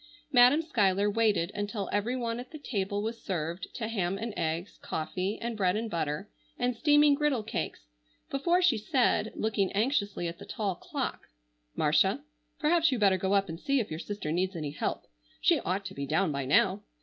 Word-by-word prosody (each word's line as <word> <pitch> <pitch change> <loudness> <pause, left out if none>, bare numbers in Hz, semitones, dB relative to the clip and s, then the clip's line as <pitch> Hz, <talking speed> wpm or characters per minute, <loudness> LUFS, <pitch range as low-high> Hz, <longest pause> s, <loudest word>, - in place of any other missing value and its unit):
Madam 255 +4 +6
Schuyler 205 - +2
waited 205 -5 +2
until 205 -1 -3
every 215 +5 0
one 235 -2 -2
at 250 - -8
the 310 - -8
table 205 -7 -2
was 230 +1 -4
served 170 -1 -3
to 220 - -3
ham 195 -4 -1
and 225 +1 -4
eggs, 165 +4 -3
coffee 185 +5 -3
and 235 0 -3
bread 185 -3 +2
and 220 0 -3
butter, 155 +2 -2 0.3
and 245 0 0
steaming 295 +2 +5
griddle 280 -5 +1
cakes, 210 - -4 0.5
before 345 +7 +2
she 270 -11 +4
said, 220 -1 +1
looking 205 -3 0
anxiously 205 -5 0
at 170 0 -6
the - - -9
tall 205 -3 -2
clock: - - -5 0.5
"Marcia, - - +2 0.3
perhaps 330 0 +3
you 255 - +1
better 200 -3 +4
go 190 +2 0
up 195 0 +2
and 165 -1 -6
see 275 +3 +1
if 220 - -3
your 155 - -4
sister 200 -5 -4
needs 185 +3 0
any 150 -3 -3
help. 150 - -3 0.4
She - - +4
ought 190 +3 -2
to 190 - -6
be 140 -4 -4
down 195 +3 +1
by 140 -2 -2
now. 185 +8 +3
205 Hz, 190 wpm, -29 LUFS, 185-245 Hz, 0.5 s, Madam